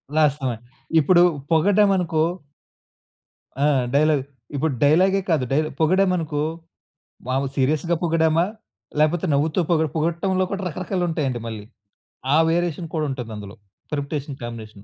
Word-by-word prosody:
Last 150 -2 +2
one. 115 - -4 0.4
ఇప్పుడు 175 +4 +5 0.3
పొగడ్డం 200 +5 +4
అనుకో 165 -3 0 1.4
ఆ! - - +4 0.3
డైలాగ్. 150 -2 +3 0.3
ఇప్పుడు 145 +1 0
డైలాగే 185 +7 +4
కాదు 155 -6 +2
డైరె 155 +3 +1
పొగిడామనుకో 165 -3 +2 0.9
మాములు 135 +1 -1
సీరియస్‌గా 150 +5 +1
పొగిడామా, 165 0 +2 0.5
లేకపోతే 160 +4 +2
నవ్వుతూ 155 +5 +1
పొగు 160 -1 +3
పొగట్టంలో 170 +4 0
కూడా 195 -1 -3
రకరకాలుంటాయండి 165 - -2
మళ్ళీ. 110 -2 -6 0.7
ఆ - - +5
వేరియేషన్ 170 0 -1
కూడా 155 -2 0
ఉంటుంది 125 -4 -5
అందులో. 105 0 -9 0.4
Permutation 145 -1 -4
combination. 110 -4 -8
155 Hz, 115 wpm, -22 LUFS, 140-175 Hz, 1.4 s, ఇప్పుడు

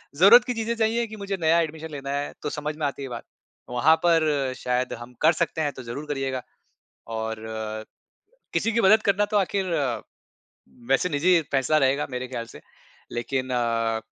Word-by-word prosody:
ज़रूरत 200 +10 +8
की 250 - -1
चीज़ें 230 0 -2
चाहिए 230 +1 +1
की 220 - -9
मुझे 200 -1 -3
नया 165 +1 +4
एडमिशन 160 0 -5
लेना 140 -1 -5
है 145 +1 -2
तो 150 - -2
समझ 150 +1 -4
में 155 - -1
आती 140 - -5
है - - -4
ये - - -7
बात। 120 -2 -6 0.5
वहाँ 125 +6 +4
पर 155 -6 +2
शायद 125 0 -1
हम 120 +1 -10
कर 160 +2 +6
सकते 165 -1 -1
हैं 145 -2 0
तो 130 - -9
ज़रूर 120 +6 -6
करिएगा 135 -3 -2 0.8
और 110 0 -4 1.1
किसी 230 - +1
की 230 - +2
मदद 215 +1 +6
करना 200 +1 +2
तो - - +4
आख़िर 195 0 0 1.2
वैसे 135 +7 +3
निजी 170 +3 +3
फैसला 140 +3 +3
रहेगा 140 +1 +2
मेरे 125 0 -4
ख़्याल 120 -2 -4
से। - - -10 0.5
लेकिन 130 +2 -2
अ, 115 -2 0
145 Hz, 185 wpm, -25 LUFS, 130-180 Hz, 1.2 s, ज़रूरत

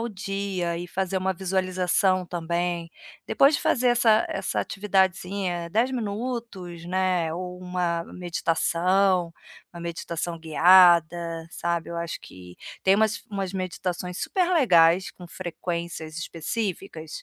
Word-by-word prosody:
o 235 - -2
dia 195 -4 -3
e 175 +1 -6
fazer 190 +1 -2
uma 190 0 0
visualização 185 0 +1
também, 170 0 -2 0.3
depois 280 +3 +4
de - - 0
fazer 250 -1 +2
essa 230 -2 +4
essa 195 -1 -2
atividadezinha, 190 -3 0
10 235 +7 +1
minutos, 215 -6 -4
né, 180 -3 0
ou 180 +1 -6
uma 180 -2 -1
meditação, 180 +1 +1 0.4
uma 170 - -9
meditação 170 0 -4
guiada, 170 0 +4
sabe, 170 -1 -2
eu 170 - -5
acho 170 -1 -4
que 90 -1 -13 0.3
tem 190 +1 +4
umas 215 0 +1
umas 195 -2 -3
meditações 180 -1 -4
super 365 -2 0
legais 180 - +4
com 180 - -13
frequências 170 -2 -5
específicas, 170 -1 -4
180 Hz, 120 wpm, -25 LUFS, 170-195 Hz, 0.4 s, depois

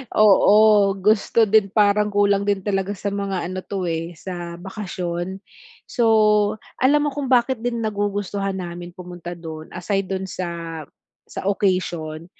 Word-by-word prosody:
Oo, 210 -1 +5
gusto 210 +3 +2
din, 215 -1 +4
parang 210 0 +3
kulang 200 0 +2
din 200 -2 0
talaga 195 0 -1
sa 200 +1 -4
mga 200 -3 -2
ano 185 +1 -4
'to, 195 -1 -4
eh, 165 +1 -3
sa 175 -1 -7
bakasyon. 185 -1 -5 0.4
So, 240 -2 0 0.7
alam 290 +3 +3
mo - - +1
kung 280 -1 -4
bakit 250 -1 +2
din 235 -1 -2
nagugustuhan 205 -2 -2
namin 175 -1 -7
pumunta 175 -1 -8
do'n, 160 -2 -8
aside 195 +1 -1
do'n 190 0 -3
sa 170 -3 -5 0.5
sa - - -7
occasion, 175 -5 -1
195 Hz, 140 wpm, -22 LUFS, 175-210 Hz, 0.7 s, Oo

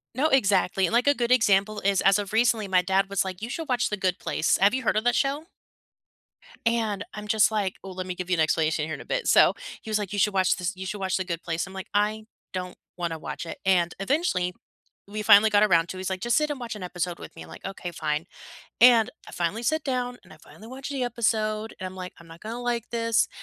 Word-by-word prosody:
No, 290 +5 +2
exactly, 195 -7 +3
and, - - -5
like, 245 +4 +3
a 285 - +6
good 240 -2 -1
example 210 -3 +3
is, 195 -1 +2
as 195 +1 +5
of 205 0 -5
recently, 225 -2 +2
my 185 -1 +3
dad 190 +2 +1
was 200 -1 +1
like, 185 0 -6
"You 230 - -4
should 320 +4 -5
watch 245 -1 +1
The 210 - -2
Good 185 -2 -1
Place." 160 - +1
Have 200 +3 +4
you 260 0 -1
heard 215 - +1
of 215 - +1
that 245 - +2
show? 285 +3 0 1.2
And 220 -4 0
I'm 210 0 -7
just 215 +1 +4
like 200 -3 -1
ooh, 190 - -7
let 185 0 -6
me 180 - -4
give 180 0 -6
you 180 - +3
an - - -3
explanation 155 -1 +1
here 160 - -5
in - - -10
a - - -12
bit. - - -2
So, - - +6 0.3
he - - -10
was 215 -1 +1
like, 205 -2 -5
"You 205 - -1
should 210 +1 +2
watch 185 -1 +3
this 180 +2 -3
you 190 +1 -7
should 195 +2 -4
watch 190 -1 0
The 190 - -3
Good 170 -2 -4
Place." 165 +2 -2
I'm 190 - -11
like, 190 -1 -7
"I 210 +1 +1 0.3
don't 180 -1 -5 0.2
wanna 170 -2 -3
watch 170 - -6
it." - - -7
And 175 -2 +3
eventually, 195 - 0 0.6
we 215 +1 -4
finally 210 0 +7
got 205 0 +4
around 170 -5 +4
to 185 - -6
it, - - -7
he's 190 - -3
like, 190 - -3
"Just 240 0 +1
sit 300 0 +1
and 280 - -5
watch 235 -2 -5
an 205 - -7
episode 175 -1 -3
with - - -10
me." - - -10
I'm - - -14
like, - - -12
"Okay, 190 -2 -6
fine." 150 -1 -2 0.6
And 235 -1 +7 0.2
I - - -11
finally 175 +7 -2
sit 315 +7 0
down, 250 -2 -2
and - - -16
I 155 - -15
finally 210 +7 -15
watched 265 +3 -7
the 270 -2 -2
episode, 220 -2 -1
and 185 - -4
I'm 185 - -8
like, 180 -1 -7
"I'm 170 - -15
not 165 +1 -13
gonna 230 +3 -6
like 240 -1 -2
this." 230 -1 +1
205 Hz, 265 wpm, -26 LUFS, 185-235 Hz, 1.2 s, finally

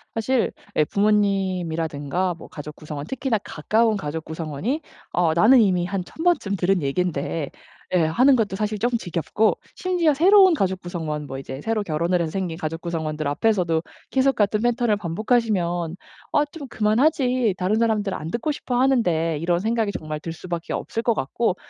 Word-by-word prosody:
사실 235 +2 +1 0.2
예 155 - +4
부모님이라든가 185 -5 0
뭐 - - -12
가족구성원 150 0 -7
특히나 265 -3 -1
가까운 220 +8 +1
가족구성원이 160 - -3 0.3
'어 170 -2 +2
나는 230 +7 +6
이미 180 -4 +2
한 190 -1 -2
1000 320 - -8
번쯤 290 - +2
들은 185 -1 +1
얘기인데.' 150 0 -1 0.4
예 175 -3 +4
하는 255 - +4
것도 205 -4 0
사실 210 0 -2
쪼끔 240 +1 +1
지겹고 180 +4 0 0.2
심지어 350 -5 +2
새로운 375 +4 +6
가족 190 - 0
구성원 160 -5 -4
뭐 135 - -6
이제 135 0 -7
새로 220 -2 -1
결혼을 170 +1 0
해서 160 -2 -2
생긴 180 -4 -3
가족 165 0 -4
구성원들 155 -3 -3
앞에서도 170 0 +1 0.3
계속 270 0 +2
같은 210 0 +2
패턴을 240 -2 +2
반복하시면 180 -3 0 0.4
'아 295 - +4
좀 285 -6 -8
그만하지 245 - +2
다른 190 +4 +1
사람들 215 -4 +1
안 160 +2 -5
듣고 240 +6 -1
싶어 250 -3 -2
하는데.' 175 - +2
이런 175 0 +1
생각이 220 0 0
정말 155 -4 -5
들 165 - -5
수밖에 170 0 -6
없을 230 - -3
것 235 - +3
같고 180 - 0
190 Hz, 370 characters per minute, -23 LUFS, 165-230 Hz, 0.4 s, 나는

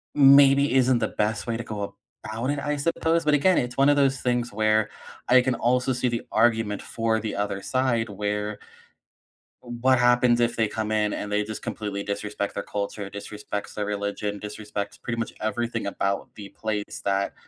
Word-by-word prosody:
maybe 140 -1 +7
isn't 130 -2 +4
the - - 0
best 110 +2 -1
way 115 -1 -1
to 120 - -5
go 110 -2 -6 0.5
about 110 +5 -3
it, 145 - -2
I 145 +2 -1
suppose. 165 +2 0
But 150 - +3
again, 180 +6 +4
it's 120 +1 -1
one 135 +1 +5
of 145 - +5
those 135 -2 +2
things 120 -3 0
where 110 0 +2 0.4
I 125 0 +6
can 125 -1 0
also 125 +3 +1
see 125 +1 0
the 115 - -2
argument 110 -2 +2
for 115 -1 -1
the 110 -1 -4
other 100 -1 -2
side 120 -4 0
where 105 +1 -3 1.0
what 120 +1 +1
happens 120 0 +4
if 120 0 +1
they 115 -2 +2
come 110 0 -3
in 105 -1 +1
and 105 - -4
they 105 0 +1
just 110 0 -6
completely 100 -2 -4
disrespect 100 0 -3
their - - -3
culture, 100 0 -4
disrespects 105 0 -6
their 105 - -2
religion, 100 0 -3
disrespects 105 0 -6
pretty 115 -1 -4
much 115 - -3
everything 115 +1 -2
about 100 0 -2
the 100 -2 -9
place 105 -2 -4
that, 100 0 0
110 Hz, 185 wpm, -25 LUFS, 105-125 Hz, 1.0 s, maybe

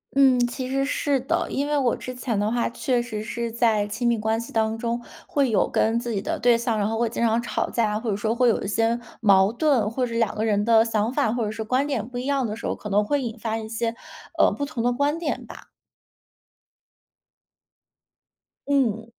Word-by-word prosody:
嗯， 265 -2 +5
其 255 +1 -5
实 275 +1 0
是 280 0 0
的。 265 - -1
因 280 +2 -1
为 295 - 0
我 260 -5 +2
之 255 - -7
前 245 -4 -2
的 210 +1 0
话 240 0 0
确 245 +1 0
实 220 -3 -5
是 235 +1 -4
在 225 -3 +2
亲 215 +4 -2
密 235 - +3
关 220 +1 0
系 235 - -8
当 220 0 +1
中 235 +1 -2 0.3
会 285 -8 +1
有 215 - +2
跟 225 +1 +1
自 240 0 -4
己 200 -3 -1
的 - - -2
对 240 -1 +4
象， 230 -1 -1
然 205 -1 +1
后 225 +1 -2
会 235 -1 +1
经 235 - -2
常 230 +1 +2
吵 235 - -2
架 220 -3 +1
啊， 210 - -1
或 225 -1 -2
者 - - 0
说 220 +3 -1
会 250 +1 +3
有 225 - +1
一 - - -4
些 225 +3 +1 0.2
矛 195 -2 +5
盾。 255 -4 +2
或 250 +3 -1
者 235 - -6
两 230 -2 +1
个 215 +1 -1
人 205 -2 +2
的 225 0 +5
想 220 0 0
法 275 -6 +1
或 240 -1 -1
者 210 - -2
说 220 0 -5
观 255 +5 +1
点 240 -7 -2
不 250 -1 -7
一 250 - -5
样 275 -2 +1
的 215 -2 -3
时 230 - -8
候， - - -1
可 210 - -8
能 205 +1 +3
会 285 +7 0
引 235 -1 -5
发 225 0 -2
一 220 -1 -6
些， 230 +1 -2 0.4
呃， - - +5
不 285 - -3
同 275 -6 -4
的 245 - +2
观 285 +4 0
点 330 -3 -3
吧。 - - -12 3.0
嗯。 240 -6 +1
235 Hz, 255 characters per minute, -24 LUFS, 220-255 Hz, 3.0 s, 嗯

